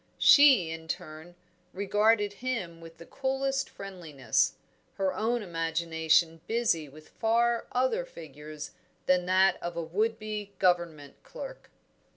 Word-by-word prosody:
She, 265 - +6
in 160 0 -8
turn, 160 +2 -7 0.4
regarded 205 +1 +2
him 195 -10 -3
with 165 0 -13
the 170 - -12
coolest 270 +2 -2
friendliness, 160 - -1 0.4
her 190 -1 0
own 230 +1 -1
imagination 165 -1 0
busy 220 -10 0
with 155 +3 -15
far 235 +1 +1
other 260 - +1
figures 155 - -10 0.3
than 180 -1 +2
that 190 +1 +3
of 175 0 -5
a 170 - -2
would 215 +7 -1
be 210 -2 -6
Government 170 -6 0
clerk. - - -10
185 Hz, 125 wpm, -29 LUFS, 165-230 Hz, 0.4 s, She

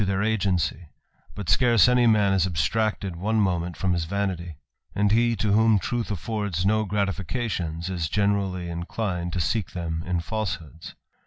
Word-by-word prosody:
their 100 0 0
agency; 95 -7 0 0.5
but 100 - -6
scarce 120 -3 +5
any 125 -1 +4
man 105 -3 +4
is 95 -2 +2
abstracted 100 +2 -1
one 110 +6 0
moment 90 -4 0
from 95 0 0
his 85 -2 -1
vanity; 90 -3 -3 0.4
and 105 0 +2
he, 115 +1 +3
to 105 0 0
whom 110 +1 +5
truth 120 +4 -2
affords 100 -2 -2
no 110 +2 +3
fications, 95 -3 -2
is 85 -4 -2
generally 100 -2 0
inclined 85 +1 -3
to 90 - -2
seek 90 +4 -1
them 80 -2 -3
in 90 -1 0
falsehoods. 85 -5 -5
95 Hz, 155 wpm, -25 LUFS, 85-110 Hz, 0.5 s, scarce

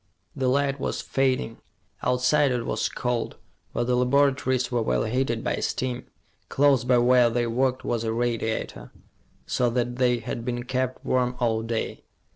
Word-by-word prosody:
The 130 -1 0
light 140 +1 +1
was - - -2
fading. 130 -4 -1 0.4
Outside, 125 +4 +3
it 120 -2 -1
was - - -1
cold, 120 -2 -2 0.3
but - - -1
the 125 +1 +1
laboratories 130 0 +2
were 120 -1 +1
well 110 - +1
heated 120 0 -1
by - - -1
steam. 125 -1 -2 0.4
Close 140 -3 +3
by 125 0 +3
where 120 0 +5
they 120 +1 0
worked 130 +2 0
was 115 -1 -1
a 110 - -1
radiator, 115 - -2 0.6
so 125 -1 +1
that 120 0 -1
they 125 -1 +3
had 115 +1 -5
been 120 0 -3
kept 130 +1 -2
warm 125 -1 +1
all 115 -2 +1
day. 115 0 -3
125 Hz, 160 wpm, -25 LUFS, 120-130 Hz, 0.6 s, where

